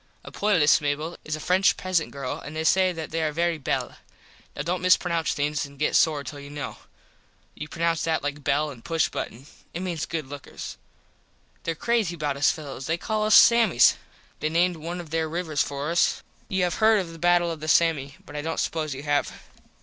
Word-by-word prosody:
A - - -10
poilus 180 -10 +3
Mable 150 +3 -2
is 155 - -3
a - - -7
French 185 +4 +3
peasant 185 -4 0
girl 135 -2 -5
an 150 +2 -9
they 160 - -2
say 185 +3 +4
that 160 -3 -6
they 165 +1 -1
are 155 -1 0
very 170 +1 0
belle. 135 - -2 0.6
(Now - - -3
don't 175 +3 -2
mispronounce 175 -2 +2
things 150 +1 -1
an 140 0 -10
get 150 - 0
sore 150 -3 +3
till 145 +2 -8
you 140 0 -10
know. 145 0 -6 0.8
You 150 - -7
pronounce 165 0 0
that 160 -3 0
like 145 0 -1
the 145 - -15
bell 145 +2 +1
in 125 -4 -12
push 165 +4 0
button. 125 +4 -6 0.3
It 175 - -3
means 175 -4 -3
good 160 -3 -3
lookers.) 140 +1 -8 0.9
There 165 - -1
crazy 220 -2 0
about 150 -3 -2
us 140 +1 +3
fellos. 140 -4 -7
They 165 +1 0
call 215 +3 -1
us 215 - +6
Sammies. 230 - +7 0.5
They 155 - -1
named 175 +2 +2
one 170 +3 -5
of 165 -3 -9
there 160 -1 0
rivers 160 -3 -1
for 145 +2 -2
us. 170 - +2 0.2
You 190 -1 0
have 180 +4 -1
heard 220 -1 +6
of 175 -4 -4
the 165 - -11
battle 175 0 +3
of 165 - -6
the 155 - -6
Samme. 155 -4 +2
But - - -11
I 150 - -2
dont 160 +2 -3
suppose 155 -3 -2
you 135 - -8
have. 145 -1 +1
160 Hz, 215 wpm, -25 LUFS, 145-175 Hz, 0.9 s, Sammies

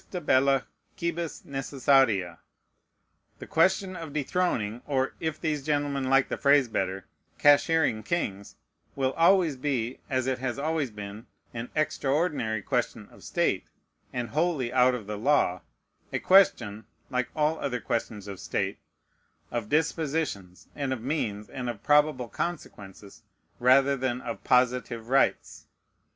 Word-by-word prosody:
"Justa 180 - -6
bella 135 -3 +3 0.3
quibus 170 -1 -3
NECESSARIA." 135 - +1 1.0
The - - -9
question 185 +3 +2
of 165 -4 -7
dethroning, 135 - -1
or, 135 -2 0
if 160 -1 -3
these 150 -4 -2
gentlemen, 145 -2 -1
like 135 0 +4
the - - -4
phrase 140 -2 +4
better, 95 -3 -2 0.3
"cashiering 145 -4 +4
kings," 100 - -3 0.4
will 135 -1 0
always 170 -4 +4
be, 130 -3 -2
as 130 -2 0
it 130 -1 -1
has 130 -1 -3
always 155 -1 -1
been, 105 +1 -9 0.3
an 115 +1 -5
extraordinary 145 - 0
question - - -2
of - - -17
state, - - 0 0.5
and 120 -2 -3
wholly 155 -6 0
out 125 0 +4
of 115 -4 -7
the 105 0 -5
law: 115 -8 +2 0.5
a - - 0
question 110 - +3 0.3
(like 125 -1 -1
all 155 +1 +1
other 125 -3 -2
questions 110 -3 -3
of 100 -2 -7
state) 95 0 -2 0.7
of 115 -3 -3
dispositions, 150 - -1
and 140 -2 -2
of 125 - -5
means, 110 -7 -2
and 125 -2 -5
of 115 -3 -7
probable 150 -4 +3
consequences, 105 - -6 0.4
rather 135 +3 +5
than 130 -2 -2
of - - -6
positive 125 -2 +1
rights. 135 +1 +1
130 Hz, 135 wpm, -27 LUFS, 115-150 Hz, 1.0 s, rather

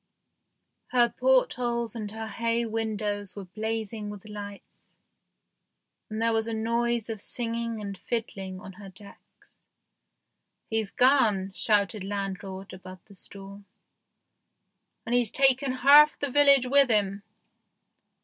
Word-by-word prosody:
Her 240 -2 +2
portholes 245 - +1
and 215 -3 -5
her 220 +1 -7
bay 230 0 0
window 215 -2 -3
were 200 -2 -7
blazing 215 +2 -4
with 205 0 -10
lights, 205 -1 -10 1.2
and 215 0 -5
there 230 0 +1
was 225 0 0
a 225 - -3
noise 235 +1 -1
of 220 -3 -5
singing 230 -1 -3
and 200 -1 -6
fiddling 195 -3 -5
on 190 - -11
her 195 - -10
decks. 200 +2 -18 0.6
" - - -53
He's 220 -2 0
gone," 220 -8 +3
shouted 205 -1 0
landlord 195 -1 -5
above 185 0 -12
the 205 - -17
storm, 200 +1 -12 1.4
"and 235 - -3
he's 245 -3 +2
taken 270 +1 +3
half 285 +4 +6
the 285 -2 -3
village 280 -2 +5
with 275 +1 +4
him 205 -2 0
220 Hz, 125 wpm, -27 LUFS, 200-235 Hz, 1.4 s, half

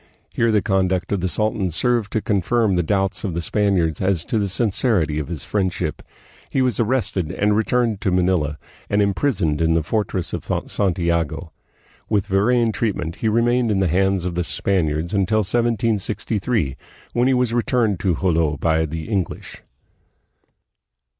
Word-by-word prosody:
Here 115 -1 +2
the 105 -2 +2
conduct 95 -1 0
of 100 -3 0
the 95 - 0
sultan 105 -1 0
served 115 +5 0
to 110 - +1
confirm 105 +2 +1
the 90 - +2
doubts 95 +2 -1
of 95 -6 -3
the - - -1
Spaniards 90 -5 +1
as 95 -3 +1
to 110 - 0
the 100 -1 -1
sincerity 95 - +1
of 75 - -4
his 80 -6 -5
friendship. 95 -5 -2 0.5
He - - -1
was 125 -5 0
arrested, 110 -8 0
and 105 +1 +1
returned 110 -1 +1
to - - +1
Manila, 90 -5 +1 0.3
and 100 - +1
imprisoned 100 - +1
in 80 0 +3
the 80 - +1
fortress 95 -1 -2
of - - -3 0.3
Santiago. 85 -4 -1 0.6
With 105 -2 +1
varying 115 +4 +2
treatment 100 -8 -2
he 110 - 0
remained 120 +2 +2
in 105 - +1
the 95 -1 +2
hands 95 +1 +1
of 90 - -2
the 90 +1 -1
Spaniards 85 -2 -1
until 100 +2 +2
1763, 110 - 0 0.4
when 120 +1 +2
he 130 - +3
was 125 -2 +1
returned 115 -5 +1
to 90 -4 +1
Jolo 80 -4 +1
by 80 +2 +1
the 80 0 -6
English. 95 -5 -3
95 Hz, 160 wpm, -21 LUFS, 85-110 Hz, 0.6 s, in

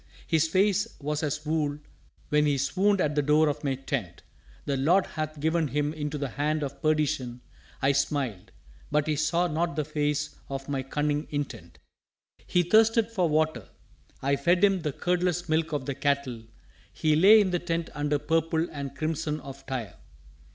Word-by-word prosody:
His 160 -1 +2
face 200 +4 +2
was 150 +1 -2
as 150 0 -2
wool 150 -2 0 0.5
when 150 0 +3
he 145 -1 +2
swooned 195 +8 +2
at 150 -4 +1
the 145 - +2
door 150 +2 +4
of 150 +1 -2
my 135 -2 0
tent. 125 - -4 0.4
The 140 - 0
Lord 170 +8 +3
hath 155 -1 -5
given 160 +1 +1
him 145 +2 -1
into 150 -1 -4
the 140 -2 -3
hand 150 +4 -1
of 140 0 -6
perdition, 150 -6 0 0.4
I 135 - +5
smiled 135 -7 -1 0.4
but 150 0 +1
he 155 - 0
saw 160 +4 +1
not 170 -1 -1
the 150 -1 -1
face 150 -1 -1
of 135 0 -5
my 140 -2 -1
cunning 145 +2 -1
intent. 130 - -5 0.7
He 180 - +3
thirsted 225 +4 +4
for 185 -7 +1
water: 155 +1 0 0.6
I 140 +1 +2
fed 175 +6 +2
him 195 -3 +4
the 150 -2 -1
curdless 175 +2 0
milk 160 0 +1
of 145 -4 -2
the 140 - -2
cattle. 135 -5 -1 0.5
He 155 - +1
lay 200 +7 +8
in 195 -3 +2
the 175 - +1
tent 165 -1 -3
under 145 0 0
purple 165 +2 0
and 140 -2 -6
crimson 155 -1 -2
of 135 0 -10
Tyre. 125 -8 -4
150 Hz, 175 wpm, -27 LUFS, 140-165 Hz, 0.7 s, lay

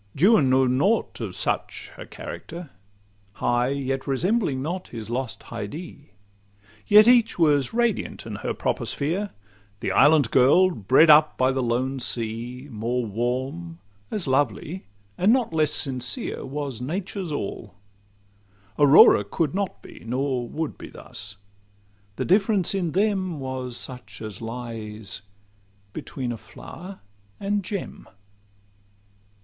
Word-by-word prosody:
Juan 180 - +5
knew 130 0 +4
nought 145 - +1
of - - -4
such - - -3
a - - -9
character— 170 -2 -8 0.6
High, 120 +4 +1
yet 135 0 -2
resembling 155 - +1
not 180 +4 -4
his 115 -1 -7
lost 125 0 -3
Haidee; 140 - -8 0.7
Yet 210 +2 +8
each 240 -2 +5
was 145 -6 +3
radiant 235 -2 -1
in - - -5
her - - -3
proper - - -1
sphere: 180 +9 -1 0.5
The 95 - -2
island 145 +3 +5
girl, 160 +9 +5
bred 130 - +5
up 150 +1 +6
by 130 +1 +3
the 135 0 -1
lone 130 +3 -1
sea, 120 +2 -4
More 120 +3 -2
warm, 115 -6 -3 0.3
as 205 -5 -2
lovely, 140 - -1 0.3
and 195 +4 +5
not 245 -8 +2
less 155 -2 +2
sincere, 130 -3 -3
Was 135 -3 -4
Nature's 180 +5 -4
all: 105 -6 -5 1.0
Aurora 145 -7 +8
could 140 +9 -1
not 195 -1 -3
be, - - -12
Nor 125 0 -2
would 160 -1 -4
be - - -9
thus:—the 100 0 -10
difference 195 0 +3
in 180 -5 -1
them 190 -5 0
Was 130 -2 -4
such 125 -6 -7
as 110 -2 -7
lies 115 -3 -6 0.7
between 135 -5 -5
a 120 - -4
flower 185 - -11 0.4
and 200 0 -1
gem. 195 0 -6
135 Hz, 125 wpm, -24 LUFS, 120-175 Hz, 1.0 s, Yet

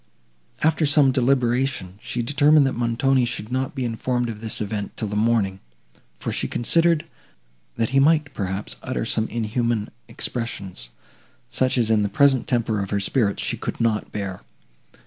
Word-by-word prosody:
After 155 0 +3
some 145 -2 +5
deliberation, 125 -6 0
she 120 - -3
determined 145 +3 +4
that 135 - 0
Montoni 125 +3 +1
should 120 -2 -3
not 130 +2 -2
be 130 -2 -2
informed 120 +1 -1
of 110 -2 -7
this 110 -1 -3
event 105 -1 -4
till 110 - -2
the 105 - -4
morning, 105 -3 +1 0.6
for - - -4
she - - -1
considered, 165 +5 +2 0.7
that 115 0 0
he 135 - +4
might, 150 0 +3
perhaps, 95 0 -4
utter - - -3
some 110 - 0
inhuman 115 -1 -1 0.2
expressions, 100 - -4 0.6
such 130 0 +2
as 115 -2 +2
in 110 -1 +4
the 100 - 0
present 135 +4 +3
temper 115 -6 0
of 100 - -4
her 100 - 0
spirits 100 0 0
she - - -1
could - - -5
not 115 -2 0
bear. 100 -3 -5
120 Hz, 165 wpm, -23 LUFS, 105-135 Hz, 0.7 s, some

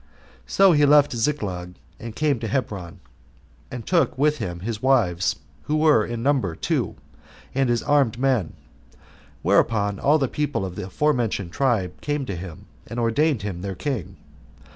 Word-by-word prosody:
So 195 -1 +5
he 150 -3 +4
left 145 0 +5
Ziklag, 100 -9 -2 0.2
and 115 -1 -8
came 150 +1 +1
to 115 - -4
Hebron, 100 -9 -3 0.7
and 125 -3 -7
took 170 -6 +1
with 150 +2 +2
him 85 -1 -4
his 110 +2 -4
wives, 105 -10 +2 0.3
who 150 - 0
were 155 -7 +4
in 115 +1 -4
number 130 - +1
two, - - -1 0.6
and 135 -1 +1
his 120 -1 +1
armed 140 -6 +2
men; 125 -9 +1 0.9
whereupon 100 +2 +2
all 150 +2 +4
the 135 -3 0
people 145 -7 -2
of 90 -2 -7
the 90 - -6
forementioned 115 - 0
tribe 115 -9 0
came 145 -2 -2
to 100 - -4
him, 85 -2 -9 0.2
and 120 - -5
ordained 120 +1 +1
him 95 -4 -4
their 95 0 -4
king. 95 - -4
115 Hz, 160 wpm, -23 LUFS, 95-145 Hz, 0.9 s, So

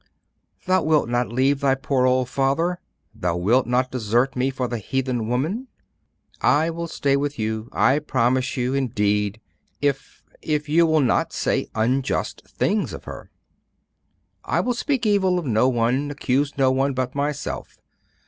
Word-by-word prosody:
'Thou 185 0 +3
wilt 155 -3 +2
not 120 -1 0
leave 135 +3 +2
thy 135 -1 +2
poor 135 -1 +1
old 130 0 +2
father? 140 +8 0 0.3
Thou 85 -1 -2
wilt 115 +8 +2
not 125 +1 +1
desert 120 +2 0
me 130 +1 +1
for 130 -1 -2
the 120 -1 -3
heathen 125 0 -2
woman?' 160 - -1 0.7
'I 160 +3 +3
will 170 +1 -4
stay 140 -3 0
with 145 +1 -2
you, 110 +1 -3
I 130 +7 +3
promise 130 -3 0
you, 125 +1 0
indeed! 105 -5 0 0.4
if 140 -1 -2 0.2
if 150 -1 -1
you 165 +3 +4
will 160 -1 +3
not 130 - +1
say - - 0
unjust 125 +4 0
things 205 +3 -1
of - - -8
her.' - - -9 1.2
'I - - +1
will 250 - 0
speak 260 0 -1
evil 190 -3 +3
of 175 - -3
no 120 0 +3
one, 125 +4 0
accuse 140 0 -1
no 135 -1 +3
one, 135 +1 0
but 130 0 -2
myself. 145 0 -4
135 Hz, 160 wpm, -23 LUFS, 125-145 Hz, 1.2 s, you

